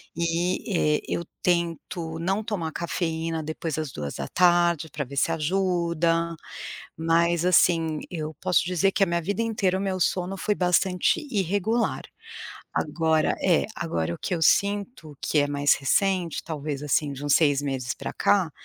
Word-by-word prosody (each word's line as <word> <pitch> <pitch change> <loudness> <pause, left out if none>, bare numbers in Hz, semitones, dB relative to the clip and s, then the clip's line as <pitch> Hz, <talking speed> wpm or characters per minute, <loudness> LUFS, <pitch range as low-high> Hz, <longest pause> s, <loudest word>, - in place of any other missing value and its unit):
e, 170 -1 0
eh, - - -14
eu 170 - -2 0.2
tento 170 -1 -1
não 195 +5 0
tomar 185 -7 -3
cafeína 165 -1 -2
depois 155 0 -4
das 155 -3 -3
14h, 170 - +1
pra 140 - -3
ver 140 +2 -10
se 165 - +2
ajuda, 170 0 0 0.6
mas 170 +1 +2
assim, 165 -3 +3
eu 155 -3 -4
posso 185 0 +2
dizer 185 +2 +1
que - - 0
a 195 - +6
minha 170 0 0
vida 200 +6 -2
inteira 200 -5 0
o - - -3
meu 190 -1 -2
sono 180 +2 0
foi 210 +2 0
bastante 180 - +2
irregular, 205 +3 0 0.7
agora 160 -2 +1
é, 175 -4 +3
agora 85 - -2
o - - -10
que 180 - -2
eu 165 - -3
sinto 200 - +1
que 155 - 0
é 145 - +4
mais 145 0 +3
recente, 180 +4 0
talvez 150 -3 -4
assim 145 0 +1
de 140 +2 -7
uns 145 - +3
6 145 -4 +4
meses 135 -2 -2
pra - - -6
cá, 190 -5 +2
170 Hz, 160 wpm, -25 LUFS, 155-185 Hz, 0.7 s, a